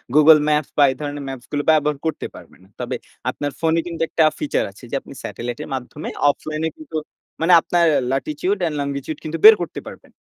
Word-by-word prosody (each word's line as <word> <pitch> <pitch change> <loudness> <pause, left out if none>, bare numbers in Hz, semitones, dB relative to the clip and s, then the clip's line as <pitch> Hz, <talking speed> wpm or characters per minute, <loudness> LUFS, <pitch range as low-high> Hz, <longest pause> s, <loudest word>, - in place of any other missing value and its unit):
Google 155 +1 +8
Maps 150 -1 +1
বা 145 - +6
এই - - -6
ধরণের 145 -1 -5
ম্যাপসগুলো 135 +2 -4
ব্যবহার 150 -1 +2
করতে 160 - -2
পারবে - - -14
না। - - -20
তবে - - -3 0.3
আপনার 145 0 -3
ফোনে 165 0 +2
কিন্তু 170 -1 -6
একটা 160 - +2
feature 150 - -1
আছে 100 - -18
যে - - -1
আপনি - - -12
satallite 120 +5 -5
এর - - -10
মাধ্যমে 130 +4 -6 0.2
অফলাইনে 155 +2 -2
কিন্তু 315 - -11 0.5
মানে 170 +2 +4
আপনার 175 0 +2 0.3
latitude 150 +8 -1
and 160 - -3
longitude 140 +2 -4
কিন্তু 160 +1 -4
বের 220 0 +12
করতে 175 - -4
পারবেন। - - -12
150 Hz, 195 wpm, -21 LUFS, 140-160 Hz, 0.5 s, বের